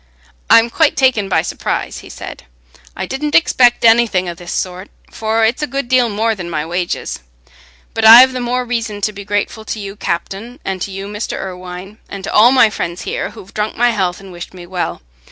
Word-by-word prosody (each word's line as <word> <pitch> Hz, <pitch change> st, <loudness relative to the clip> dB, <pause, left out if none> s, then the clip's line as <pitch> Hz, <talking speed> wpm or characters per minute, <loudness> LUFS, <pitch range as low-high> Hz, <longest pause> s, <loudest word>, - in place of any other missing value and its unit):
"I'm 230 Hz, +1 st, +6 dB
quite 315 Hz, +2 st, +2 dB
taken 250 Hz, -7 st, +2 dB
by 160 Hz, -3 st, +2 dB
surprise," -, -, -3 dB
he -, -, -13 dB
said. -, -, -9 dB, 0.5 s
"I -, -, -2 dB
didn't 295 Hz, +3 st, -3 dB
expect 245 Hz, -8 st, +4 dB
anything 225 Hz, -5 st, +4 dB
o' 175 Hz, -, -3 dB
this 175 Hz, +1 st, -9 dB
sort, 185 Hz, +1 st, -4 dB, 0.2 s
for 220 Hz, 0 st, 0 dB
it's 235 Hz, +6 st, 0 dB
a 300 Hz, -, -1 dB
good 275 Hz, -2 st, -3 dB
deal 250 Hz, -2 st, +3 dB
more 220 Hz, +2 st, 0 dB
than 175 Hz, -5 st, -7 dB
my 150 Hz, -2 st, -2 dB
wages. 175 Hz, +1 st, -3 dB, 0.7 s
But 225 Hz, -, -2 dB
I've 245 Hz, +4 st, +9 dB
the 255 Hz, -, -3 dB
more 250 Hz, +1 st, -1 dB
reason 230 Hz, -4 st, -3 dB
to 210 Hz, +1 st, -1 dB
be 200 Hz, 0 st, -8 dB
grateful 205 Hz, +2 st, -2 dB
to 220 Hz, -, -4 dB
you, 200 Hz, -1 st, -7 dB
Captain, 205 Hz, -, -4 dB
and 190 Hz, -1 st, -3 dB
to -, -, -3 dB
you, 195 Hz, 0 st, -6 dB
Mr. 210 Hz, +2 st, -4 dB
Irwine, 185 Hz, +2 st, -8 dB
and 195 Hz, -1 st, -7 dB
to -, -, -5 dB
all 230 Hz, +4 st, +7 dB
my 250 Hz, -5 st, +5 dB
friends 175 Hz, -3 st, -4 dB
here, -, -, -3 dB
who've 190 Hz, -, -13 dB
drunk 210 Hz, 0 st, -3 dB
my 240 Hz, 0 st, +3 dB
health 185 Hz, -5 st, -1 dB
and 195 Hz, -1 st, -12 dB
wished 175 Hz, +1 st, -9 dB
me 175 Hz, -1 st, -10 dB
well. 180 Hz, 0 st, -4 dB
210 Hz, 210 wpm, -16 LUFS, 185-240 Hz, 0.7 s, I've